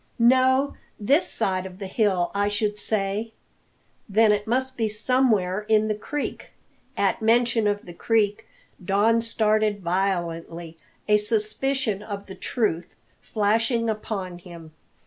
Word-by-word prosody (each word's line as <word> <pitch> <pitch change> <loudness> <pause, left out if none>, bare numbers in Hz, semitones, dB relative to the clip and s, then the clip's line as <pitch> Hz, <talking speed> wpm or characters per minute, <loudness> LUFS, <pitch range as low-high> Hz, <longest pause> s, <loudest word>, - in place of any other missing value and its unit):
"No; 260 +3 +4 0.3
this 280 - +2
side 190 -4 -1
of 185 -1 -12
the 200 - -6
hill, 190 -3 +1
I 200 0 +1
should 210 0 -1
say." 210 +2 -1 0.8
"Then 215 +2 +4
it 205 +1 0
must 260 +3 0
be 225 -3 0
somewhere 210 -4 +1
in 215 0 +3
the - - +2
creek." 285 +7 -5 0.4
At - - +1
mention 230 0 +3
of 205 0 -1
the 175 - -10
creek 210 +2 0 0.4
Don 210 +5 +3
started 215 -2 +1
violently, 170 -2 -2 0.3
a 210 0 +5
suspicion 215 +1 -1
of 200 -1 -6
the 190 - -9
truth 190 -7 -2 0.3
flashing 225 +2 +1
upon 195 -4 -5
him. 170 -3 -12
210 Hz, 130 wpm, -24 LUFS, 195-230 Hz, 0.8 s, a